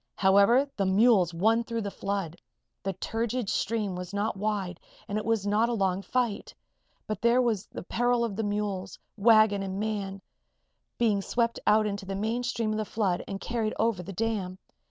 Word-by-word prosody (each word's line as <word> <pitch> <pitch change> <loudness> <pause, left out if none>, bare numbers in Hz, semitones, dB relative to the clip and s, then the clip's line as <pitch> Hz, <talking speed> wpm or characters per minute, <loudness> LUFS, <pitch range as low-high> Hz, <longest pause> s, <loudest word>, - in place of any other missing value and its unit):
However, 200 +8 +5
the 195 -2 0
mules 195 -2 +4
won 220 +7 +2
through 230 0 -3
the 200 - -4
flood. 195 -5 -3 0.5
The 195 +1 -2
turgid 225 +3 -2
stream 210 -4 -1
was 180 +2 -6
not 210 +2 -1
wide 200 -3 -2 0.3
and 205 - -4
it - - -6
was 225 -3 +1
not 215 +3 +2
a - - 0
long 195 -3 0
fight. 235 -1 -2 0.5
But 215 - -4
there 235 +2 +4
was 230 -6 0
the - - -8
peril 240 +4 +1
of 215 -4 -4
mules, 205 -2 -3 0.2
wagon 215 -2 +5
and 195 0 -4
man 205 -2 -3 0.8
being 215 -4 +2
swept 235 +3 0
out 215 +1 +5
into 200 -2 -4
the 195 - -3
main 220 +5 -1
stream 230 -3 -1
of 215 - -1
the - - 0
flood 195 -5 -1
and 195 -1 -5
carried 225 -1 -2
over 220 -4 +1
the 180 +3 -8
dam. 195 -3 -2
210 Hz, 180 wpm, -28 LUFS, 195-225 Hz, 0.8 s, However